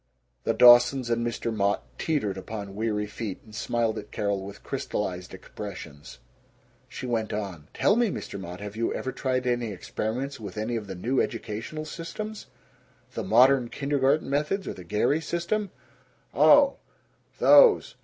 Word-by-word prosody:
The - - +1
Dawsons 120 +1 +6
and 115 0 +1
Mr. 115 -1 -2
Mott 100 0 +1 0.2
teetered 140 - -1
upon 100 +1 -7
weary 105 -1 -1
feet, 105 -1 -6
and 110 - -16
smiled 115 0 -1
at 105 - -11
Carol 100 -2 -1
with 100 +1 -10
crystallized 90 -3 -4
expressions. 90 - -9 0.7
She 130 - -7
went 115 -3 -1
on: 95 -8 -5
"Tell 205 - +3
me, 240 0 +3
Mr. 100 - -6
Mott: 90 0 -8
Have 105 0 -7
you 115 +1 -1
ever 130 - -3
tried 130 -1 -1
any 120 -3 0
experiments 115 +8 -4
with 105 -2 -8
any 110 +3 -2
of 110 -3 -4
the 95 - -6
new 125 +9 0
educational 115 +7 -4
systems? 205 +7 -7 0.7
The - - -3
modern 125 +2 +5
kindergarten 140 +1 +1
methods 150 +8 -1
or - - -3
the 90 - -11
Gary 105 - +1
system?" 175 +6 -2 0.6
"Oh. 285 -1 +6 0.6
Those. 485 -4 +6
115 Hz, 155 wpm, -26 LUFS, 105-140 Hz, 0.7 s, Dawsons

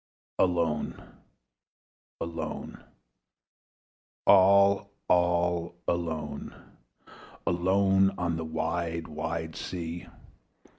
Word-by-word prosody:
Alone, 85 -4 +1 1.2
alone, 85 -1 -5 1.4
all, 100 +1 +6 0.2
all 85 -1 +2
alone, 80 -4 -3 0.9
Alone 95 +2 +3
on 85 -2 -1
a - - -3
wide 80 +1 -2
wide 80 +1 -4
sea! 85 -1 -5
85 Hz, 60 wpm, -28 LUFS, 80-90 Hz, 1.4 s, all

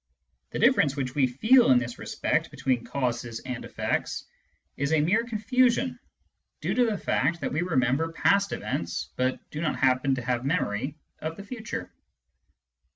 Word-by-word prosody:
The - - -5
difference 150 - +4
which 130 -3 -3
we 135 -3 +3
feely 220 - +5
in 125 - +7
this 125 0 -3
respect, - - -1
between 125 -3 -1
causes 120 -4 -2
and 125 -1 -5
effects - - -2 0.5
is 140 +3 -1
a 160 - +4
mere 185 +10 +3
confusion 245 +2 +1 0.6
due - - -1
to 250 - +3
the 215 -2 0
fact 165 +1 0
that - - -2
we 150 - +1
remember 155 -1 +1
past 200 +4 +2
events 85 -5 -3
but 130 0 0
do 150 - -4
not 160 - 0
happen 130 0 +2
to 125 - -5
have 120 0 -1
memory 135 -3 -1 0.2
of 160 +1 -5
the 200 - -7
future. 225 +2 -6
140 Hz, 160 wpm, -27 LUFS, 125-200 Hz, 0.6 s, in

